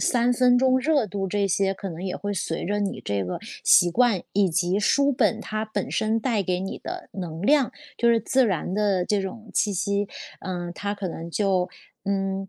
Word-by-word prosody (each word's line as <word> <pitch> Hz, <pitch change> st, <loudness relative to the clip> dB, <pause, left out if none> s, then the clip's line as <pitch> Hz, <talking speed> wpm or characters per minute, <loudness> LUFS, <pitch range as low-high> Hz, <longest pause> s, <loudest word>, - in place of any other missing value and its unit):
三 245 Hz, 0 st, +2 dB
分 245 Hz, 0 st, +4 dB
钟 260 Hz, 0 st, +4 dB
热 280 Hz, -4 st, +2 dB
度， 195 Hz, -1 st, -3 dB
这 200 Hz, +1 st, +1 dB
些 195 Hz, +1 st, +1 dB
可 195 Hz, -1 st, -6 dB
能 165 Hz, +2 st, -7 dB
也 185 Hz, -, -3 dB
会 205 Hz, 0 st, -3 dB
随 165 Hz, -3 st, -3 dB
着 205 Hz, +3 st, -1 dB
你 200 Hz, -, -2 dB
这 100 Hz, -1 st, -1 dB
个 90 Hz, -, -4 dB, 0.3 s
习 175 Hz, -, +6 dB
惯， 230 Hz, -2 st, +3 dB
以 195 Hz, -1 st, +3 dB
及 180 Hz, +3 st, +1 dB
书 280 Hz, +6 st, +3 dB
本 225 Hz, -3 st, +2 dB
它 215 Hz, 0 st, -3 dB
本 215 Hz, -, -3 dB
身 220 Hz, +1 st, +1 dB
带 220 Hz, -4 st, 0 dB
给 180 Hz, 0 st, -1 dB
你 190 Hz, -, -4 dB
的 -, -, -7 dB
能 170 Hz, -3 st, -6 dB
量， 280 Hz, +2 st, +4 dB, 0.3 s
就 235 Hz, -, +3 dB
是 230 Hz, -1 st, +5 dB
自 255 Hz, +3 st, +2 dB
然 180 Hz, -2 st, -1 dB
的 200 Hz, -3 st, +1 dB
这 205 Hz, 0 st, +1 dB
种 215 Hz, +3 st, -7 dB
气 205 Hz, -2 st, +1 dB
息， 200 Hz, +2 st, 0 dB, 0.3 s
嗯， 175 Hz, -2 st, -4 dB
它 205 Hz, 0 st, -3 dB
可 200 Hz, -2 st, -4 dB
能 165 Hz, 0 st, -7 dB
就 190 Hz, -2 st, +1 dB, 0.4 s
嗯， 195 Hz, -1 st, -1 dB
200 Hz, 220 characters per minute, -25 LUFS, 185-225 Hz, 0.4 s, 习